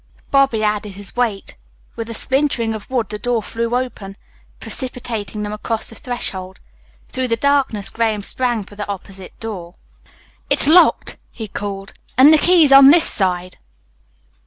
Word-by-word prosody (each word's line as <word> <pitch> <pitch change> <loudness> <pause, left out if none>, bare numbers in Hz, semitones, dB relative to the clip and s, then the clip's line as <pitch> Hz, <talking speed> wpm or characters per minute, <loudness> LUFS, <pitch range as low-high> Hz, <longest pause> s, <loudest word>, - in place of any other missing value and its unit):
Bobby 270 -6 +2
added 210 -1 -1
his 200 0 -8
weight. 230 -5 -2 0.4
With 230 0 -6
a 230 - -5
splintering 265 -3 0
of 215 -2 -8
wood 245 -6 -1
the 210 - -5
door 240 -2 -1
flew 230 +2 -3
open, 215 -6 -5 0.4
precipitating 230 -5 -4
them 210 0 -4
across 220 +1 -3
the 225 - -9
threshold. 190 -7 -5 0.5
Through 260 0 -2
the 230 -1 0
darkness 270 -6 0
Graham 220 -3 -1
sprang 240 -1 0
for 205 - -15
the 205 0 -6
opposite 195 -1 -9
door. 190 -6 -7 0.7
"It's - - +6
locked," 330 +5 +4
he 220 - -7
called, 195 0 -6 0.2
"and 280 +4 +8
the 310 - +5
key's 335 -5 +4
on 275 0 +9
this 330 +2 +6
side." 185 -2 -2
225 Hz, 155 wpm, -18 LUFS, 205-255 Hz, 0.7 s, on